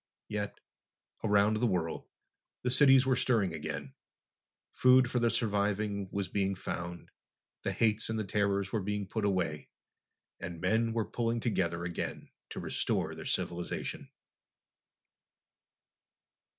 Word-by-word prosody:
Yet, 105 -1 -3 0.6
around 105 0 +4
the 120 +2 +2
world, 85 -5 -1 0.6
the 125 - +1
cities 135 -1 +7
were 130 -1 +3
stirring 115 -6 +2
again. - - -5 0.8
Food 130 0 +5
for 125 - +1
the 120 0 +3
surviving 100 -2 0
was 100 -1 -2
being 95 0 0
found. 85 -1 -5 0.5
The - - -1
hates 110 -1 +1
and 110 - -1
the 110 - 0
terrors 100 -1 0
were 110 - 0
being 105 +1 -2
put 105 +2 -2
away 90 -7 -1 0.7
and 85 -1 -6
men 115 +4 +1
were 115 -2 0
pulling 115 0 -1
together 85 -8 0
again 85 0 -4 0.2
to - - -5
restore - - -1
their - - -8
civilization. 85 0 -3
105 Hz, 125 wpm, -31 LUFS, 95-115 Hz, 0.8 s, cities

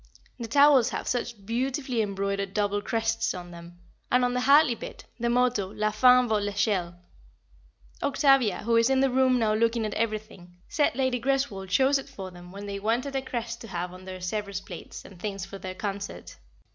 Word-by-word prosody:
The 235 - -4
towels 280 0 +5
have - - -5
such 235 -4 -3
beautifully 250 +1 -1
embroidered 200 -1 -2
double 205 -1 0
crests 225 0 -1
on 175 -1 -8
them, 170 0 -12 0.3
and 250 0 +4
on 245 - 0
the 250 - 0
Hartley 280 -1 +6
bit, - - -9
the 235 +1 0
motto 245 -5 +1
is - - -13
"La 215 0 +1
fin 250 +3 +5
vaut 215 -2 +1
l'eschelle." 200 -4 -1 1.1
Octavia, 275 -9 +3
who 230 +1 +2
is 230 +2 +4
in 265 0 +3
the 270 -1 +2
room 260 0 +3
now 220 -3 +2
looking 230 +1 +1
at 210 - -3
everything, 215 -5 -4
said 295 -5 +1
Lady 260 -2 0
Greswold 265 -8 -1
chose 270 +8 +3
it 270 - -10
for 195 -8 -8
them 175 0 -13
when 200 +1 -8
they 200 -1 -4
wanted 240 +7 -1
a 270 - +1
crest 235 -3 -5
to 225 - -8
have 180 -2 -4
on 185 0 -12
their 185 0 -7
Sèvres 195 +1 -4
plates - - -9
and 190 -3 -14
things 195 -1 -4
for 195 0 -9
their 185 -1 -6
concert. 200 0 -5
220 Hz, 195 wpm, -27 LUFS, 195-250 Hz, 1.1 s, Hartley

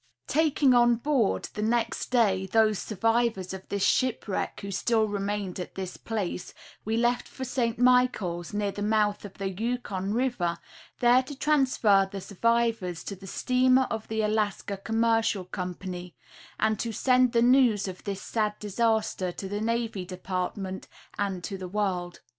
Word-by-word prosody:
Taking 295 -3 +3
on 240 -1 +5
board, 245 -3 +1
the 210 - -4
next 230 +2 0
day, 200 -6 +2
those 215 -1 +3
survivors 225 -3 0
of 190 0 -9
this 200 -1 -1
shipwreck 250 -6 0
who 200 - -5
still 220 +2 +1
remained 200 -2 -3
at 180 - -6
this 185 -1 -5
place, 205 -5 -4 0.3
we 220 +1 -1
left 240 +1 +1
for 260 - -8
St. 235 -3 -1
Michaels, 245 -9 +2
near 205 -1 -1
the 205 - -7
mouth 210 -1 +1
of 200 - -10
the 195 -1 -3
Yukon 205 -2 -3
river, 220 -8 0 0.4
there 245 +1 +6
to 260 +2 -9
transfer 255 -10 +3
the 200 - -5
survivors 225 -3 0
to 200 - -5
the 195 +1 -12
steamer 255 +5 +3
of 220 -1 -4
the 220 0 -1
Alaska 210 -1 -1
Commercial 225 -1 +1
Company, 180 -1 -6 0.4
and 220 -1 +1
to 230 - -2
send 255 +2 +3
the 230 0 +4
news 245 -5 +4
of 185 -1 -7
this 195 -2 -4
sad 210 -2 -1
disaster 210 -3 0
to 190 - -6
the 205 +2 -3
Navy 230 -3 -1
Department 185 +1 -4 0.3
and 195 -3 -2
to 195 0 -5
the 185 - -5
world. 180 -3 -2
215 Hz, 160 wpm, -27 LUFS, 195-235 Hz, 0.4 s, there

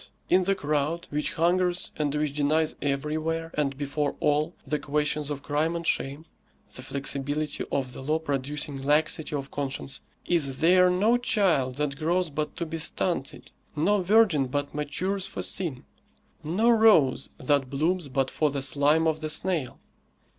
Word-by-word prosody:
in 185 +1 +4
the 195 +1 +2
crowd 150 +1 -1
which 150 +4 -1
hungers 175 +1 +1
and 150 -1 -1
which 150 -1 -1
denies 155 +2 +1
everywhere, 155 +3 -2
and 140 -2 -1
before 145 0 -2
all, 150 +3 +1
the 150 - -1
questions 150 0 -1
of 145 -1 -5
crime 155 +3 0
and 170 0 -4
shame 140 +2 -1 0.5
(the - - -4
inflexibility 140 +2 -2
of 130 -2 -1
the - - -8
law 155 +4 +1
producing 145 -1 -3
laxity 150 +2 +1
of 140 0 -5
conscience), 135 -1 -3 0.2
is 140 -6 +2
there 180 +2 +5
no 205 +7 +3
child 185 - +1
that 140 -1 -2
grows 170 +2 0
but 150 +1 -3
to 170 - -2
be 165 0 -5
stunted, 160 -3 -2 0.2
no 190 +7 +2
virgin 185 -8 +4
but 145 +2 -3
matures 180 +7 -2
for - - -5
sin, 160 -9 -3 0.6
no 205 +10 +2
rose 205 - +4
that 135 0 +1
blooms 160 +4 0
but 135 0 -1
for 155 - +1
the 140 -1 -2
slime 145 +4 +3
of 155 -1 0
the 155 - -3
snail? 160 -5 -1
150 Hz, 160 wpm, -27 LUFS, 140-170 Hz, 0.6 s, there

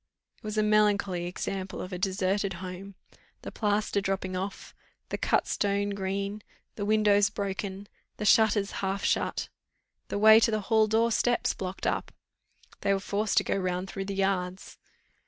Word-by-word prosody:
It - - -38
was 215 0 -4
a 215 - +3
melancholy 205 -4 +2
example 190 +1 -4
of 185 - -6
a 180 - -4
deserted 190 +1 0
home: 185 +2 -8 0.5
the - - -6
plaster 205 -1 0
dropping 190 -1 -2
off, 190 +2 -5 0.4
the - - -2
cut - - +1
stone 205 0 0
green, 200 +1 -3 0.3
the 205 - -4
windows 210 -1 +4
broken, 200 -1 -4 0.3
the 210 - -4
shutters 210 -1 +4
half 195 0 -2
shut, - - 0 0.6
the - - -3
way 220 +1 +8
to 230 - +3
the 215 -1 0
hall 220 +1 +3
door 225 +2 +2
steps 240 +2 +1
blocked 185 0 -6
up. - - -1 0.7
They 200 - +2
were - - -1
forced 205 +2 -1
to - - +6
go - - -1
round 185 -1 -2
through 195 -1 -4
the 200 0 -4
yards. 190 -1 -2
200 Hz, 165 wpm, -28 LUFS, 190-210 Hz, 0.7 s, way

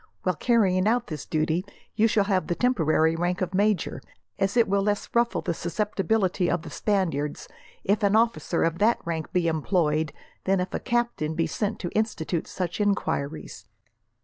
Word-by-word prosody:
While 185 - +2
carrying 195 -2 +2
out 240 +3 +2
this 155 -4 -7
duty 160 +3 0 0.3
you 220 +1 +3
shall 215 -2 +3
have 195 -2 0
the 175 - 0
temporary 160 -9 +2
rank 175 +2 -1
of 185 -2 -2
major, 205 -1 +1 0.4
as 195 +3 +1
it 235 - +5
will 200 0 +2
less 205 +1 0
ruffle 235 0 +2
the - - -1
susceptibility 195 +1 0
of 175 -1 0
the - - -9
Spaniards, 165 -8 -1 0.4
if 205 +3 +1
an 200 0 +3
officer 225 -6 +2
of 165 +1 0
that 225 +3 +4
rank 165 -2 -3
be 180 -2 +1
employed, 160 -2 +1 0.3
than 195 0 +2
if 180 - -3
a - - -1
captain 240 -11 -1
be 165 - +1
sent 205 +6 -2
to 175 - -3
institute 185 -6 -1
such 180 +1 -3
enquiries. 155 - -2
185 Hz, 175 wpm, -26 LUFS, 165-210 Hz, 0.4 s, it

